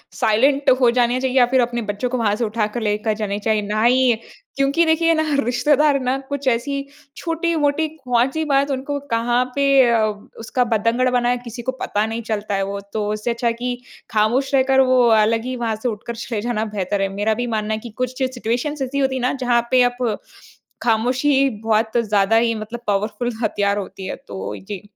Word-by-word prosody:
Silent 270 +6 +2
हो 245 - +6
जाने 245 +1 +2
चाहिए 260 0 -1
या 245 - +7
फिर 260 -1 +4
अपने 240 0 -1
बच्चों 210 +3 -3
को 255 - -1
वहाँ 210 -3 +1
से 235 - -2
उठाकर 215 +1 -2
लेकर 210 0 0
जाने 200 0 -2
चाहिए। 215 0 +1
ना 215 +1 0
ही 250 +1 +4 0.4
क्योंकि 280 +5 +2
देखिए 330 +1 +3
ना 315 -1 +1 0.2
रिश्तेदार 275 +4 +2
ना 255 +1 0
कुछ 285 -1 -4
ऐसी 275 +3 0 0.3
छोटी-मोटी 320 -2 0
कौन-सी 265 0 0
बात 280 -1 +2
उनको 275 +2 -3
कहाँ 240 +2 +2
पे 275 -1 +4
अ, 225 -2 +3 0.3
उसका 240 +3 0
बतंगड़ 230 +4 +1
बनाए, 245 0 +1
किसी 240 0 -7
को 260 - -2
पता 210 +1 0
नहीं 225 +1 -4
चलता 215 -2 -3
है 195 - 0
वो। 200 +1 -4
तो 210 -1 -1
उससे 215 +3 -2
अच्छा 235 0 -1
है 230 - +2
कि 245 +1 -3 0.4
खामोश 235 +6 +1
रहकर 265 0 +3
वो 255 -1 +5 0.2
अलग 225 +1 +1
ही 255 0 -3
वहाँ 230 -3 -2
से 250 - +1
उठकर 225 +2 -6
चले 230 -1 -4
जाना 225 -1 -1
बेहतर 195 +1 -1
है। 195 - +1
मेरा 210 +2 +1
भी 245 +2 -3
मानना 215 0 -1
है 215 - -2
कि 235 - -9
कुछ 255 0 -3
चे 265 - +1
सिचुएशंस 255 +4 -3
ऐसी 270 +2 -2
होती 265 -1 +1
हैं 260 - -2
ना 250 - +1
जहाँ 245 -3 +1
पे 255 -1 +5
आप 245 -3 0 0.7
ख़ामोशी 255 +4 +2
बहुत 220 +1 +1
ज़्यादा 210 -1 +2
ही 230 0 +3
मतलब 220 +2 -6
पावरफुल 210 +4 -1
हथियार 200 -2 +1
होती 195 -1 -6
है, - - -4
तो 270 -8 -7
जी। 195 -1 -7
240 Hz, 200 wpm, -20 LUFS, 220-265 Hz, 0.7 s, या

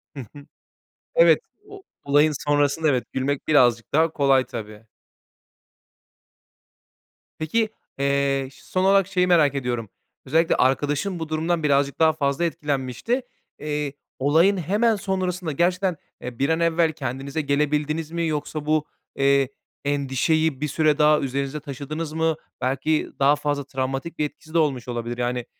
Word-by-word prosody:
Hı - - -7 0.2
hı, 145 0 -11 0.7
evet, - - +6 0.3
o 400 -1 -11 0.2
olayın 145 +2 +4 0.2
sonrasında 145 +2 +2
evet, 125 -3 +1
gülmek 135 +3 -2
birazcık 120 -6 +3
daha 160 +3 +4
kolay 135 -3 +3
tabii. 110 -1 -8 2.5
Peki, 215 +8 0 0.3
eee, 140 -1 +1
ş - - -19
son 185 0 -1
olarak 195 -1 +4
şeyi 180 -2 +1
merak 150 -6 +4
ediyorum. 120 -5 -2 0.4
Özellikle 160 +5 +2
arkadaşın 145 +7 +1
bu 160 -1 -5
durumdan 160 +1 -1
birazcık 140 0 +1
daha 160 -1 +5
fazla 140 +2 -1
etkilenmişti, 145 - -2 0.4
eee, 150 -2 -3 0.3
olayın 165 +8 +4
hemen 210 +7 +2
sonrasında 185 -4 -2
gerçekten, 180 +3 +1 0.3
e, 125 -1 -7
bir 140 +3 +1
an 160 +1 +2
evvel 165 -1 +2
kendinize 140 +1 -4
gelebildiniz 150 +2 0
mi 170 -1 -1
yoksa 150 0 -3
bu, 155 0 +1 0.3
eee, 140 -1 +3 0.4
endişeyi 145 +2 0
bir 150 - 0
süre 150 0 +2
daha 150 0 +5
üzerinizde 140 +2 -3
taşıdınız 150 +2 -6
mı? 160 0 +1 0.3
Belki 135 +5 0
daha 140 +2 +5
fazla 145 -1 -2
travmatik 135 +4 -4
bir 150 - +2
etkisi 155 +2 -10
de - - +2
olmuş 135 -6 0
olabilir, 120 0 -4
yani, 125 0 -2
150 Hz, 140 wpm, -23 LUFS, 135-160 Hz, 2.5 s, evet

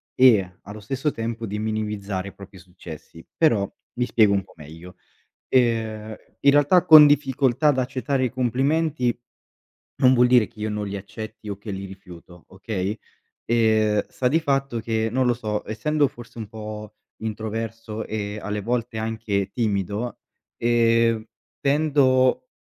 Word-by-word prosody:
e 100 -8 +4
allo 105 +1 -9
stesso 135 +8 -2
tempo 115 -1 -4
di 105 0 -4
minimizzare 105 -3 -3
i - - -17
propri 100 -1 -13
successi. 85 -2 -12
Però, 110 -12 +2 0.3
mi 125 - +2
spiego 105 -3 +4
un 100 -1 +1
po' - - -20
meglio, 80 +3 -12 0.5
ehm 110 -3 0 0.2
in 140 - +5
realtà 145 +5 +4
con 155 -1 +10
"difficoltà 140 -1 +2
ad 140 -3 +3
accettare 130 +1 -1
i 130 - +1
complimenti" 130 +2 0 0.8
non 130 0 +5
vuol 125 -1 +5
dire 120 -3 +5
che 105 - -19
io 110 - -2
non 105 0 -3
li 100 - -5
accetti 110 +2 -8
o 100 - -4
che 105 +1 -8
li 95 0 -5
rifiuto, 90 -3 -13
okay, 95 +1 -3 0.5
ehm, 110 -2 +2
sta 130 - -3
di 160 +6 +2
fatto 135 -5 -1
che, 110 0 -1
non 130 +1 +1
lo 120 - +3
so, 105 -3 -4
essendo 145 +7 +1
forse 120 -1 -13
un 110 - -6
po' 105 -1 -8 0.3
introverso 110 0 -5
e 105 -1 -4
alle 105 0 -3
volte 115 +1 -2
anche 110 -3 -2
timido, 105 +1 -2 0.4
ehm, 115 -1 +2 0.4
tendo 140 - +2
110 Hz, 150 wpm, -23 LUFS, 105-125 Hz, 0.8 s, con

